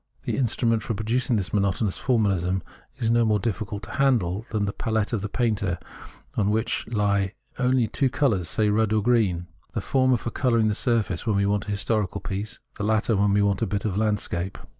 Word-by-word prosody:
The - - -2
instrument 115 -2 +1
for 115 0 -3
producing 115 +4 0
this 100 -4 -2
monotonous 100 0 +1
formahsm 95 -7 +1 0.3
is 115 -1 0
no 120 0 +4
more 110 -2 +3
difficult 105 0 -3
to - - -8
handle 115 -7 +1
than 105 -2 0
the 100 - -2
palette 110 0 -1
of 105 -3 -1
a 105 - -3
painter, 105 -7 0 0.6
on 100 -2 +1
which 110 +2 -1
he 100 -3 +2 0.3
only 125 -2 +3
two 135 +5 +1
colours, 115 - +1
say 105 -2 +2
red 110 +1 +2
and 110 -1 +2
green, 105 -8 +2 0.3
the - - +1
former 130 -2 +2
for 115 - -5
colouring 115 -4 +2
the - - +1
surface 110 -4 0
when 110 - +2
we 100 0 +2
want 105 +1 0
a - - -2
historical 100 -1 0
piece, 100 +4 -4 0.2
the - - -2
latter 110 +1 +2
when 100 +1 +3
we 100 +1 +3
want 100 0 +1
a 115 - +1
bit 100 0 -2
of 100 -4 -1
landscape. 100 -3 -1
105 Hz, 205 wpm, -25 LUFS, 100-115 Hz, 0.6 s, no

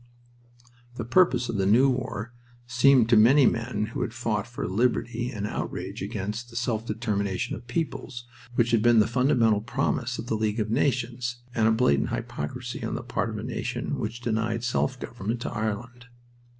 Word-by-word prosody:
The 115 - -4
purpose 125 -3 +3
of 110 - -2
the 95 -1 +1
new 120 +7 +5
war 120 -3 -2 0.3
seemed 125 0 +5
to 120 - +6
many 125 +6 +6
men 115 -2 0
who - - -3
had 115 - -3
fought 110 -3 -1
for 120 - -4
"liberty" 120 +3 0
an 105 -5 -4
outrage - - -4
against 110 +5 -4
the 115 - -14
"self 115 -1 -1
determination 105 -4 -1
of 120 +3 -11
peoples" 130 -4 -4 0.3
which 120 0 +2
had 115 -2 +4
been 120 0 +5
the 105 - +6
fundamental 120 -3 +3
promise 125 0 -1
of - - -5
the 120 - -2
League 110 0 0
of 110 0 -1
Nations, 120 -1 -1
and 110 -2 +3
a - - +5
blatant 110 - +2
hypocrisy 125 +12 -5
on - - -2
the - - -4
part 120 -1 -2
of 110 - -5
a 105 - -5
nation 120 +3 -3
which 115 +3 -4
denied 115 0 -1
self 125 +1 0
government 115 0 -4
to - - -3
Ireland. 120 +3 -4
120 Hz, 180 wpm, -26 LUFS, 110-125 Hz, 0.3 s, to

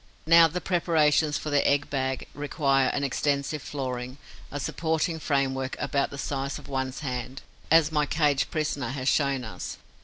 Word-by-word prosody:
Now 165 +1 +7
the 175 +3 -4
preparations 160 -4 +2
for 155 - -5
the 145 -1 +3
egg 145 0 +1
bag 130 -2 -2
require 140 -2 +1
an 140 - -1
extensive 140 +2 -1
flooring, 130 -2 -5 0.3
a 145 - -4
supporting 160 +2 -1
framework 135 -3 -1
about 140 -1 0
the 140 - -8
size 140 0 -3
of - - -12
one's 130 0 -3
hand, 130 -1 -4 0.3
as 160 -1 +5
my 150 -2 +1
caged 145 -3 +1
prisoner 155 -3 -2
has 130 -1 -4
shown 140 -2 +2
us. 110 - -6
140 Hz, 160 wpm, -27 LUFS, 135-155 Hz, 0.3 s, Now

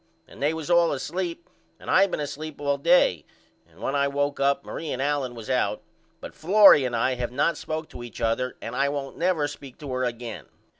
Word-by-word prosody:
And - - -15
they 145 +2 +2
was 160 +1 -4
all 170 -1 +5
asleep 170 +4 -4 0.3
and - - -14
I 195 +1 +5
been 180 - -4
asleep 150 +1 -6
all 140 -1 0
day 140 - +4 0.5
and 85 +2 -22
when 135 - -2
I 140 0 +2
woke 145 0 -1
up 140 0 +1
Marie 160 - -6
and 125 - -3
Allen 140 -3 -1
was 115 -2 -9
out 130 -1 0 0.4
but - - -9
Florrie 185 -5 +6
and 120 -1 -2
I 125 +3 +1
have 120 -1 -3
not 145 +6 +1
spoke 155 0 -5
to - - -10
each 120 -2 -9
other 115 +3 -1
and 115 - -5
I 140 +2 +2
won't 140 -1 -4
never 170 -4 +1
speak 135 -2 -10
to 145 -3 -7
her 130 0 -1
again. 120 -2 -5
140 Hz, 215 wpm, -25 LUFS, 125-155 Hz, 0.5 s, Florrie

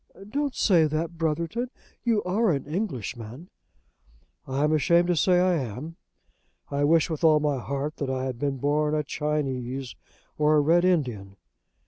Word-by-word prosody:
"Don't 280 +3 -2
say 175 -6 +4
that, 160 +2 -3
Brotherton. 170 +10 -1 0.3
You 225 -4 +1
are 205 +5 +1
an 140 -5 0
Englishman." 135 - -5 1.0
"I 135 +2 -1
am 150 +1 +2
ashamed 170 +3 +3
to 175 - +3
say 180 +4 +3
I 180 0 +3
am. 140 +2 -4 0.8
I 140 0 0
wish 160 +1 +4
with 160 -2 -5
all 155 -2 +6
my 145 -3 0
heart 140 +4 -4
that 140 - -3
I 130 0 -2
had 130 -3 -4
been 140 -1 -1
born 150 +3 +1
a 150 - 0
Chinese 135 -4 -3 0.4
or 150 +1 +4
a - - +5
Red 170 +4 +3
Indian." 120 - 0
150 Hz, 160 wpm, -26 LUFS, 135-170 Hz, 1.0 s, all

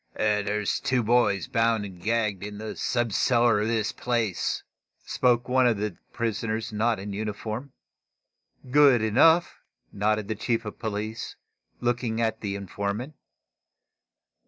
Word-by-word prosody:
"There's 105 -1 0
two 125 -2 +1
boys 105 -5 +2
bound 115 -2 +1
and 90 -3 -10
gagged 105 -2 0
in 105 +1 -6
the 110 +1 -6
sub 120 -3 -1
cellar 120 -3 +3
of 105 - 0
this 110 -2 0
place," 115 -6 -1 0.4
spoke 120 -1 +2
one 130 0 +4
of 115 -3 +2
the 105 +1 -2
two 85 - -23
prisoners 110 -1 -2
not 110 +2 +1
in 100 +1 -6
uniform. 110 +5 -4 1.0
"Good 140 -5 +6
enough," 160 +10 +4 0.3
nodded 105 0 0
the 110 - -1
chief 115 +1 -1
of 105 - -7
police, 110 0 -4 0.5
looking 120 -2 -1
at 110 -1 0
the 100 -2 -3
informant. 100 - -4
110 Hz, 135 wpm, -26 LUFS, 105-120 Hz, 1.0 s, Good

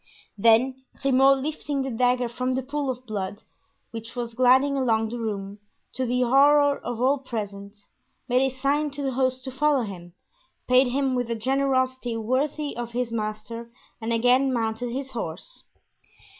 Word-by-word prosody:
Then 235 +5 +3 0.2
Grimaud, 270 0 +4
lifting 290 -2 -2
the 265 - -3
dagger 245 +1 +2
from 255 +2 -2
the 260 +1 -1
pool 280 +1 -3
of 255 0 -4
blood 205 -3 -5 0.5
which 230 +1 -8
was 240 -1 -4
gliding 260 +3 +4
along 225 -4 +1
the 240 +1 -5
room, 205 -2 -4 0.3
to 260 -1 -2
the 250 +1 +1
horror 285 +3 +5
of 240 -1 -5
all 265 +3 +2
present, 205 -5 -6 0.5
made 250 0 +3
a 270 - +2
sign 280 +3 0
to 285 0 -5
the 270 - 0
host 255 0 0
to 260 - -5
follow 280 0 +2
him, 175 -5 -8 0.5
paid 255 +1 +5
him 265 +1 0
with 245 -2 -1
a 230 - -1
generosity 260 0 0
worthy 280 +6 -1
of 235 0 -5
his 245 -1 -2
master 230 +1 -4 0.3
and 225 +1 -3
again 250 +4 +3
mounted 230 0 -1
his 265 +2 -5
horse. 220 - -7
250 Hz, 165 wpm, -25 LUFS, 230-270 Hz, 0.5 s, horror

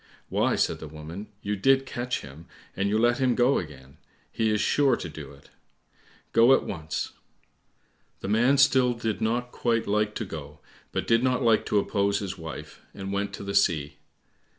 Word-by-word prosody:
"Why," - - +1
said - - 0
the 80 - -7
woman, 80 +7 -8 0.2
"you 105 +1 -1
did 135 +6 +3
catch 120 -1 -3
him, 70 +4 -12 0.3
and 100 +1 0
you 105 - +2
let 120 +2 +3
him 130 -2 +2
go 125 +3 +3
again; 70 -5 -10 0.3
he 110 -1 0
is 105 0 +1
sure 135 +3 +3
to 90 - -6
do 75 -3 -9
it. 70 - -19 0.8
Go 120 +4 +7
at - - -1
once." 80 -4 -4 1.1
The - - -4
man 120 +7 +3
still 130 -3 +4
did 115 -2 -3
not 120 +2 -1
quite 115 -2 0
like 105 +1 0
to 110 - -3
go, 75 -4 -8 0.3
but - - -2
did 115 0 +3
not 130 0 +1
like 115 -2 +3
to 105 - +1
oppose 100 0 +1
his 95 -2 -4
wife, 80 -3 -9
and 95 0 -5
went 100 0 -1
to - - -7
the 100 0 -4
sea. 85 -7 +1
105 Hz, 185 wpm, -26 LUFS, 85-120 Hz, 1.1 s, Go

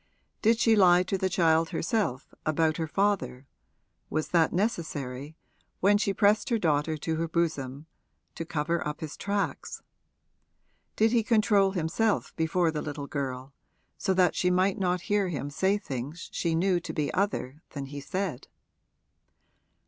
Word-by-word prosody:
Did 225 +1 +4
she 225 -1 +4
lie 180 -3 +6
to 185 - -2
the 190 0 0
child 165 -2 +3
herself, 165 - -2
about 155 0 +1
her 160 - -2
father 195 -7 0 0.6
was 155 0 -2
that 165 -2 +3
necessary, 155 - -3 0.4
when 205 +2 +4
she 200 -1 +1
pressed 205 +2 +2
her 235 - +2
daughter 155 -4 +1
to 160 +2 -2
her 165 +1 -1
bosom, 155 -4 -2 0.5
to - - -5
cover 165 +1 -1
up 150 - -5
his 155 -2 -5
tracks? 200 0 -3 1.1
Did 220 +1 +3
he 235 -1 +3
control 210 -4 +3
himself 190 +5 0
before 165 +1 +1
the 150 -1 -3
little 145 -1 -5
girl 135 -2 -4 0.4
so 190 - 0
that 180 -2 +4
she 180 - +1
might 185 +2 +2
not 180 -2 0
hear 205 0 0
him 145 -3 -4
say 190 +7 +1
things 140 0 -6
she 165 -2 -1
knew 180 +1 +2
to 175 - -7
be 150 -2 -1
other 155 -8 -1
than 140 -2 -4
he 145 +1 -7
said? 185 -5 -4
170 Hz, 155 wpm, -28 LUFS, 150-195 Hz, 1.1 s, lie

